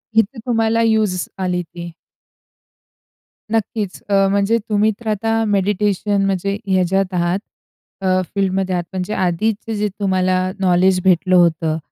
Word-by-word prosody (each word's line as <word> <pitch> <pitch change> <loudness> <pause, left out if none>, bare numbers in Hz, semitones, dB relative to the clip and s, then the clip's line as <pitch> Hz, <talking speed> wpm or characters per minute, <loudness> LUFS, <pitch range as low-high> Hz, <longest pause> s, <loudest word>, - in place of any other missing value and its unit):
इथे 225 +3 +2
तुम्हाला 225 -2 +1
युज 220 -4 +2 0.3
आली 180 -1 0
ती. 170 0 -9 1.6
नक्कीच. 215 -3 -2
अ, 195 -1 +4
म्हणजे 200 +3 +2
तुम्ही 215 +1 +3
तर 235 - -10
आता 225 +2 0
मेडिटेशन 205 0 +1
म्हणजे, 195 +1 -1
ह्याच्यात 190 0 +1
आहात 175 +1 0 0.6
अ, 185 -1 +2
फील्डमध्ये 190 -1 0
आहात. 175 - -1
म्हणजे 185 +2 -3
आधीचे 215 +5 -1
जे 210 0 0
तुम्हाला 185 -2 +1 0.2
नॉलेज 185 0 +3
भेटलं 185 0 +3
होतं 165 -2 +3
195 Hz, 125 wpm, -19 LUFS, 185-210 Hz, 1.6 s, अ